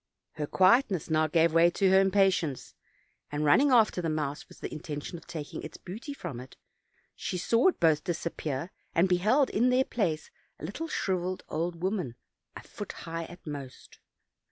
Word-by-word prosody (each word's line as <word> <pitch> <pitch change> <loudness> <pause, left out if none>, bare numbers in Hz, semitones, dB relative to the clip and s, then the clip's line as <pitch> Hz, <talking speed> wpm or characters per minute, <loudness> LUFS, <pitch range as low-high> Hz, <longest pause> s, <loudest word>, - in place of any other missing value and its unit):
Her 150 - -4
quietness 190 - +3
now 155 0 +3
gave 165 +1 +3
way 165 +1 +6
to 190 +2 +2
her 190 - +7
impatience, 190 -7 +1 0.6
and 150 +1 -1
running 265 - +5
after 225 -7 +4
the 165 - -1
mouse 150 -2 -3
with - - -15
the - - -6
intention 150 0 -6
of - - -21
taking 155 -3 -6
its 155 - -8
booty 220 - -8
from 175 - -6
it, 125 +1 -12 0.6
she 180 - -3
saw 230 - +3
both 160 - +2
disappear, 165 -2 -3 0.2
and 175 +3 +4
beheld 215 +10 +3
in 240 +4 +3
their 255 +1 +3
place 170 -9 -2 0.3
a - - -6
little 305 - -5
shriveled 185 - -2
old 170 +2 -3
woman 185 - -1 0.4
a - - -7
foot - - -8
high 165 0 -4
at 175 +2 -13
most. 140 -4 -8
175 Hz, 170 wpm, -29 LUFS, 155-195 Hz, 0.6 s, her